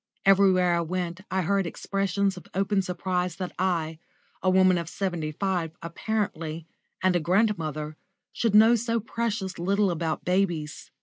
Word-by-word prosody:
Everywhere 190 -2 +5
I 170 - +2
went 175 +1 -3
I 190 0 0
heard 195 +1 +1
expressions 195 +2 -1
of 180 - -11
open 195 +1 +2
surprise 180 -1 -2
that 185 0 -4
I, 165 -4 0 0.4
a 185 - +2
woman 185 -1 +4
of 170 -1 -5
seventy 175 -6 -2
five 175 -1 -2
apparently, 170 -3 -3 0.4
and 185 -1 +3
a - - +3
grandmother, 160 -5 0 0.4
should 225 -3 +1
know 220 +2 +8
so 230 0 +1
precious 220 -4 -3
little 195 +2 +2
about 165 -1 -2
babies. 175 -6 -1
185 Hz, 145 wpm, -26 LUFS, 170-195 Hz, 0.4 s, know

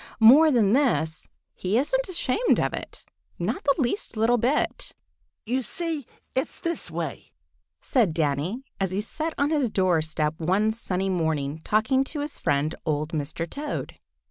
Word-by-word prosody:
More 270 +8 +8
than 225 -7 +3
this, 160 - +1 0.3
he 190 +4 -1
isn't - - 0
ashamed 365 - +1
of - - 0
it—not 390 - -6
the 280 - +3
least 250 - -1
little 235 +2 +3
bit. 260 +7 0 0.5
"You 255 +4 0
see, 325 - -2 0.3
it's 260 - -1
this 335 - -3
way," 165 -3 -5 0.5
said 230 -10 +2
Danny, 160 - -1 0.2
as 195 -1 0
he 190 +3 -1
sat 315 +9 -4
on 285 +2 +1
his 290 -6 +2
door 185 -5 +2
step 155 0 -2
one 190 +6 +2
sunny 195 -4 -2
morning 160 -4 -1
talking 225 +5 +2
to 295 +1 -4
his 290 0 -5
friend, 145 +2 +1
old 155 -1 -1
Mr. 155 +2 -3
Toad. 290 - -5
220 Hz, 150 wpm, -25 LUFS, -, 0.5 s, More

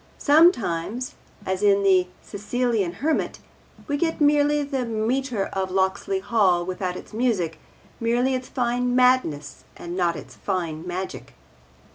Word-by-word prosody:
Sometimes, 250 - +2 0.3
as 190 0 -2
in 200 -1 +4
The 185 -2 +4 0.2
Sicilian 215 -2 -1
Hermit, 320 - 0 0.5
we 285 -1 0
get 325 +2 -1
merely 295 0 +3
the 275 -2 -2
metre 230 0 -1
of 190 -1 -1
Locksley 190 +1 0
Hall 190 -4 +2
without 180 0 -3
its - - -12
music, 215 -9 0 0.4
merely 240 +3 +1
its 255 0 -3
fine 245 0 0
madness 250 - +2
and 175 +1 -6
not 175 -2 +1
its - - -9
fine 170 -4 -3
magic. 185 +1 -6
215 Hz, 130 wpm, -24 LUFS, 185-255 Hz, 0.5 s, in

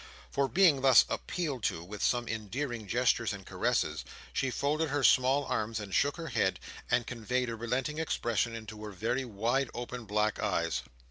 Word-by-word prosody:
For, 140 0 +1
being 170 -5 +4
thus 130 -2 +7
appealed 150 -8 -3
to 80 - -1
with 100 +4 -8
some 120 -1 +1
endearing 110 +1 -4
gestures 120 0 +2
and 100 -2 -8
caresses, - - 0 0.3
she 135 - 0
folded 150 +5 0
her 145 0 0
small 130 +3 +4
arms 110 +1 -1
and 100 -2 -7
shook 145 +3 +2
her 165 -1 -5
head, 115 - +1 0.3
and 120 - +2
conveyed 125 +1 -2
a - - -3
relenting 125 +6 -2
expression 120 -7 0
into 110 -1 -8
her 105 - -6
very 120 +7 -1
wide 120 +4 0
open 120 0 -5
black 105 +1 0
eyes. 85 -4 0
120 Hz, 175 wpm, -31 LUFS, 110-135 Hz, 0.3 s, thus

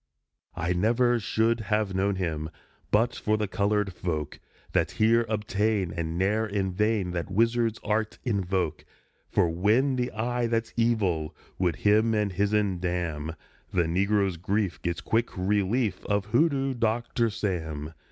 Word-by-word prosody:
_ - - -55 0.5
I 85 +1 0
never 120 +6 +2
should 110 +3 +1
have 105 -2 0
known 95 +1 +1
him 80 -4 -2 0.4
But 115 +3 +2
for 110 0 0
the 105 -1 -1
colored 100 0 0
folk 80 -4 -3 0.3
That - - +2
here 115 +1 +4
obtain 105 -3 0
And 85 -1 -3
ne'er 105 +4 +1
in 100 -2 -1
vain 105 -2 +1
That 85 0 -3
wizard's 115 +2 +1
art 105 +1 -1
invoke; 95 - -1 0.5
For - - +3
when 110 +11 +2
the 125 0 -1
Eye 120 +2 -1
that's 115 -1 -1
Evil 100 -10 +1 0.2
Would 90 -4 +1
him 110 +5 +3
and 105 -2 +1
his'n 100 -1 +1
damn, 85 -3 -2 0.4
The 90 - +2
negro's 95 +2 +1
grief 100 +1 -1
gets 85 -1 -2
quick 115 -2 0
relief 100 +2 0
Of 100 -1 +1
Hoodoo 135 +3 +2
Doctor 115 0 0
Sam. 80 -8 -3
105 Hz, 145 wpm, -27 LUFS, 90-115 Hz, 0.5 s, here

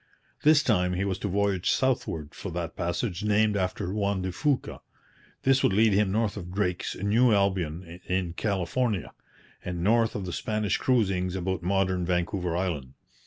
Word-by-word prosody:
This 150 0 +5
time 90 -7 +2
he 95 +2 -1
was 95 -1 -2
to 105 - -2
voyage 100 -1 0
southward 80 - 0
for 100 - -6
that 85 -1 -4
passage 85 +3 -2
named 105 0 +2
after 95 0 -2
Juan 100 -2 0
de 95 - -2
Fuca. 140 - -1 0.6
This 135 0 +4
would - - +3
lead 110 +1 +4
him 100 -1 +2
north 110 0 0
of 90 -3 -7
Drake's 90 -2 -1
New 115 +5 +3
Albion 90 -4 0
in 90 -2 -1
California, 100 - -1 0.5
and 90 -1 -4
north 115 +3 +3
of 100 - -3
the 90 - -5
Spanish 105 -3 -1
cruisings 95 -7 +1
about 95 -1 -2
modern 95 0 +1
Vancouver 90 0 -1
Island. 75 -8 -3
95 Hz, 165 wpm, -27 LUFS, 90-105 Hz, 0.6 s, This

